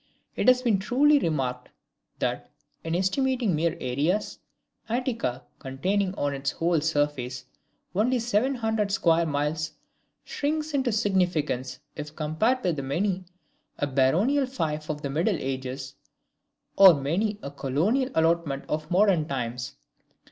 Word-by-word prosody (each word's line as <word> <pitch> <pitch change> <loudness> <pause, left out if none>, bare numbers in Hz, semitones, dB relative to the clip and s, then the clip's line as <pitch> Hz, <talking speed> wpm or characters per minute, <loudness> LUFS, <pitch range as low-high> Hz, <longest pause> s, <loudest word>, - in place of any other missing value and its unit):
It - - -1
has 255 0 +5
been 220 -6 +2
truly 280 +8 +4
remarked, 130 - -2 0.5
that, - - -2 0.3
in 165 +1 -2
estimating 230 - +1
mere 165 +2 0
areas, 150 +11 -1 0.5
Attica, 235 - -2 0.2
containing 185 +9 -1
on 145 0 -1
its 135 0 -2
whole 165 0 0
surface 145 -5 -1 0.5
only 230 +7 +2
seven 240 +3 +1
hundred 220 -4 -1
square 170 -3 +3
miles, 150 +2 -1 0.5
shrinks 305 +2 -2
into 270 -2 0
insignificance 175 - 0 0.2
if 150 +1 -7
compared 165 +12 0
with 170 -5 0
many 180 +8 -1 0.5
a - - 0
baronial 170 - +2
fief 155 - -3
of 150 -1 -4
the 140 - -2
Middle 170 +6 +1
Ages, 130 0 -4 0.8
or 190 -4 +9
many 180 +10 -1
a 140 - -5
colonial 160 - 0
allotment 160 -4 +1
of 155 0 -3
modern 180 -4 +3
times. 125 -3 -4
165 Hz, 125 wpm, -26 LUFS, 140-215 Hz, 0.8 s, or